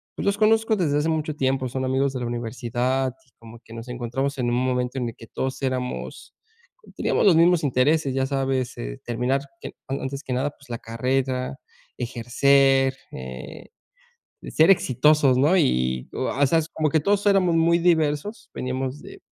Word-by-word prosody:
pues, - - -5
los 200 +1 +1
conozco 220 +1 +3
desde 155 -7 +1
hace 150 +2 0
mucho 155 -1 -1
tiempo, 130 -2 0
son 130 +1 -3
amigos 135 +1 0
de 130 - -3
la 120 - -3
universidad, 120 +2 -2
y - - -30
como 115 0 -13
que 115 - -14
nos 115 +1 -8
encontramos 125 +3 -3
en 120 - 0
un 120 - 0
momento 125 0 -1
en 125 -2 -1
el 115 - -11
que 115 - -13
todos 130 +4 -4
éramos 130 -1 -4 0.6
teníamos - - +1
los 180 - +6
mismos 170 0 +4
intereses, 140 +1 +2
ya 135 0 0
sabes, 135 -2 -1
eh, - - -6
terminar, 125 +3 0 0.2
que, - - -6 0.2
a 135 - -3
antes 135 +1 -4
que 130 - -4
nada, 130 +3 0
pues, 140 -4 -22
la 115 - -4
carrera, 130 +3 -2 0.4
ejercer, 135 +2 +2 0.2
eh, 65 0 -9 0.8
ser 160 +5 +4
exitosos, 150 -4 +4
¿no?, 155 +8 +4
y, 65 - +1
o - - -2
a 140 - -1
o - - +6
sea, 165 +5 +3
s 160 - -6
como 155 -1 0
que 160 - +3
todos 200 +5 +1
éramos 190 -4 +4
muy 170 +1 +3
diversos, 165 +3 0
veníamos 130 +2 -4
de - - -12
135 Hz, 185 wpm, -24 LUFS, 125-150 Hz, 0.8 s, los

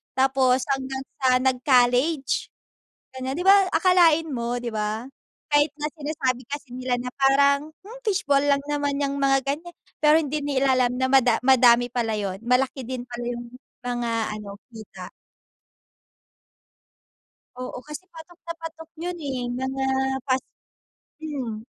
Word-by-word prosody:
Tapos, 260 -1 +3
hanggang 265 0 -5 0.2
sa 255 -1 +4
nag-college, 255 +2 +2 0.6
ganyan. 260 +2 -4
Di 355 - -3
ba, 390 -1 +6
akalain 340 -3 +4
mo, 240 0 -2
'di 240 -2 -4
ba? 215 +2 -2 0.5
Kahit 290 +1 +5
na, 295 - -6
sinasabi 275 -5 -2
kasi 285 -3 -6
nila 255 0 -1
na 250 +1 -5
parang, 280 +2 +3 0.2
"Hmm, 475 +4 -11
fishball 375 - +1
lang 280 -1 +2
naman 285 -1 -1
yang 280 0 -1
mga 270 -1 +3
ganyan." 320 +5 -4 0.3
Pero 300 0 +6
hindi 305 -1 0
nila 275 -2 +1
alam 250 -1 +2
na 260 +1 0
mada 250 -4 +5
madami 245 -2 +5
pala 225 -3 -1
yun, 195 -2 -4
malaki 250 +3 +1
din 255 -1 -4
pala 240 -1 -7
yung 240 0 -6 0.3
mga 240 -1 -2 0.3
ano, 200 -1 -9 0.2
kita. 220 -1 -10 2.5
Oo, 250 0 -6
kasi 300 +6 -9
patok 330 +1 -13
na 335 - -4
patok 325 0 -9
yun, 350 +1 -3
eh 265 -6 -4
mga 265 +2 -3 0.4
pas 260 0 +2 0.8
hmm, 260 -8 -5
265 Hz, 140 wpm, -24 LUFS, 245-295 Hz, 2.5 s, ba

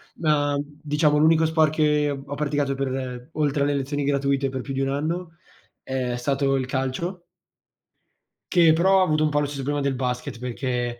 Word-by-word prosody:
Ma, 145 -3 +1
mhmm, 145 +1 -7
diciamo, 150 0 +2
l'unico 160 +1 +4
sport 160 -1 +3
che 150 -1 +2
ho 140 0 -5
praticato 145 -1 0
per 130 -1 -4
oltre 145 -2 +1
alle 145 0 +1
lezioni 140 +1 -2
gratuite, 140 -1 +1
per 130 0 -4
più 135 - -6
di 135 - -2
un 135 - 0
anno, 165 +4 -3 0.5
è 130 -2 -2
stato 135 +2 0
il 130 - -1
calcio 135 +8 -3 1.3
che 170 -3 +6
però 190 +4 +4
avuto 155 -3 +1
un - - +2
po' 145 0 +1
lo - - 0
stesso 140 -1 -5
problema 145 0 -1
del 140 - +1
basket, 125 -2 -3
perché 120 -1 -3
145 Hz, 180 wpm, -24 LUFS, 135-155 Hz, 1.3 s, che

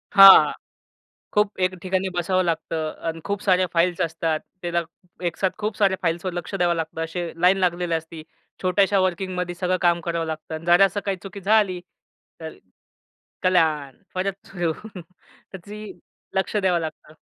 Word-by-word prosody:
हां. 195 0 +10 0.8
खूप 210 -1 +1
एक 185 0 +1
ठिकाणी 190 0 -1
बसावं 185 +1 +1
लागतं 160 -2 -2 0.2
आणि 165 0 -3
खूप 200 0 -2
साऱ्या 185 -2 +3
फाइल्स 175 +1 +2
असतात, 165 -1 -1 0.2
त्याला 170 0 0 0.5
एक 170 - -4
साथ 190 - +1
खूप 215 0 -3
साऱ्या 195 -3 +2
फाइल्सवर 170 +1 -1
लक्ष 175 +2 -6
द्यावं 175 -2 +2
लागतं, 165 0 -4
असे 170 +1 -4
लाईन 185 +2 +5
लागलेली 175 -2 0
असती. 160 0 -6 0.4
छोट्याशा 195 +1 +2
वर्किंगमध्ये 180 -1 -1
सगळं 185 +1 0
काम 175 -1 +3
करावं 170 -1 -2
लागतं, 160 0 -6
जरा 175 +3 +6
असं 200 +2 -2
काही 195 -2 -1
चुकी 195 +1 -8
झाली, 200 -2 +2 0.6
तर - - -8 0.9
कल्याण 160 -7 +2 0.2
परत 195 +1 -3
सुरू 175 -3 -2 0.3
त्याची 190 +4 -12 0.4
लक्ष 190 +2 -1
द्यावं 185 -4 +2
लागतं. 155 -1 -7
180 Hz, 150 wpm, -23 LUFS, 165-190 Hz, 0.9 s, हां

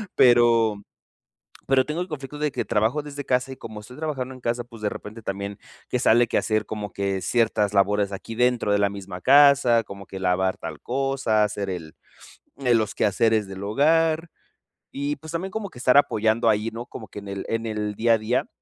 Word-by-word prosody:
pero 115 -4 +4 0.9
pero 130 -1 +3
tengo 155 +3 -3
el 180 - -7
conflicto 145 -1 -7
de 150 0 0
que - - -2
trabajo 110 +7 +1
desde 145 -1 -7
casa, 125 +1 0
y - - -8
como 110 - -9
estoy 125 +5 -13
trabajando 135 -5 -4
en 130 - -13
casa, 120 0 -2
pues, 115 -3 -14
de 105 - +1
repente 110 +2 -9
también 100 0 -4 0.3
que 125 - 0
sale 120 -1 +4
que - - -1
hacer 110 -1 0
como 105 -2 -5
que 100 -1 -2
ciertas 110 -3 +1
labores 100 +1 +2
aquí 115 +4 -7
dentro 125 -4 +2
de 105 - +3
la 100 -1 +2
misma 95 -2 -8
casa, 135 -3 +5
como 100 -1 -10
que 95 - -8
lavar 95 0 +1
tal 80 -3 -7
cosa, 135 -4 0
hacer 100 -2 -3
el 80 -4 -6 0.6
el 125 -4 +3
los 110 -2 -2
quehaceres 110 +1 +2
del 95 0 -8
hogar. 160 +8 +2 0.6
Y 140 +1 -2
pues, 160 +3 -10
también 180 +3 -3
como 220 -2 -4
que - - -14
estar 125 +2 +5
apoyando 110 -3 +2
ahí, 110 +1 0
no, 120 +2 -6
como 110 -5 -10
que - - -10
en 100 - -11
el 100 0 -5
en 115 0 -2
el 105 -1 -3
día 115 +2 +3
a - - +2
día, 110 +4 -1
115 Hz, 205 wpm, -24 LUFS, 105-130 Hz, 0.9 s, casa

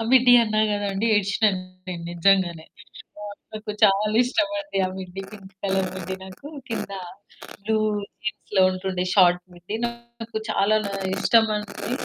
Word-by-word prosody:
ఆ! - - -1
మిడ్డి 250 -1 +7
అన్నా 215 -1 +1
కదా 205 0 -1
అండి 195 +4 -1
ఏడిసినాను 205 -1 +2 0.3
నేను 175 -2 -5
నిజంగానే. 175 -2 +2 0.6
ఆహ్, 205 -1 -7 0.2
నాకు 215 0 -6
చాలా 210 +2 +3
ఇష్టమండి. 300 -2 -1
ఆ - - -3
మిడ్డి, 185 0 -7
పింక్ 195 -2 -12
కలర్ 190 -1 +1
మిడ్డి 190 0 -5
నాకు 190 +9 -12 0.2
కింద 225 -3 -4 0.7
బ్లూ 220 +2 0 0.5
జీన్స్‌లో 210 -2 0
ఉంటుండే 185 -1 -2
షార్ట్ 180 -2 +5
మిడ్డి 175 +5 -6
నాకు 235 -1 -7
చాలా 215 +1 +3 0.4
ఇష్టమండి. 215 0 +1
205 Hz, 135 wpm, -24 LUFS, 190-220 Hz, 0.7 s, మిడ్డి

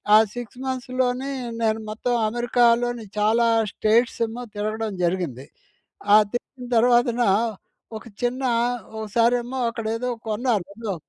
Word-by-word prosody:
ఆ - - +10 0.2
6 245 0 -7
మంత్స్ 255 -1 -4
లోనే 255 +2 -1 0.3
నేను 220 0 +1
మొత్తం 240 +3 -2 0.2
అమెరికాలోని 240 0 +2
చాలా 225 +3 +3 0.2
స్టేట్స్ 230 +3 +2
ఏమో 235 +2 -7
తిరగడం 215 +1 -2
జరిగింది. 170 -8 -1 0.7
ఆ - - +10 0.2
తిరిగిన, 245 +1 -6
తర్వాతన 240 +1 +3 0.8
ఒక 230 - -16 0.2
చిన్న 255 +2 -1 0.6
ఓసారేమో 240 +4 +1
అక్కడేదో 230 +1 -3 0.2
కొన్నాను 215 -3 0
ఏదో 220 -4 -4
235 Hz, 115 wpm, -23 LUFS, 220-245 Hz, 0.8 s, ఆ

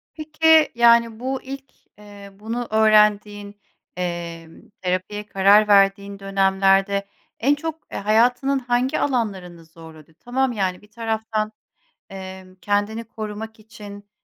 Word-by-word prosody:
Peki, 315 0 +3
yani, 235 -1 +4
bu 260 +1 -3
ilk, 270 0 -10 0.2
eee, 205 -1 -13
bunu 230 +3 -4
öğrendiğin, 210 -1 +2 0.4
emm, 170 -2 -6
terapiye 185 +3 -3
karar 205 +1 +4
verdiğin 200 0 +3
dönemlerde 195 0 +1 0.3
en 280 +5 +2
çok, 320 +1 -5 0.2
eee, - - -5
hayatının 245 +6 +2
hangi 245 +1 -1
alanlarını 190 -10 -3
zorladı? 160 -1 -15
Tamam, 260 +1 -1
yani 190 -4 -2
bir 210 0 -21
taraftan, 220 -1 -3 0.6
emm, 190 -1 -10
kendini 205 +2 -1
korumak 220 0 -8
için, 205 -2 -12
210 Hz, 115 wpm, -21 LUFS, 195-235 Hz, 0.6 s, yani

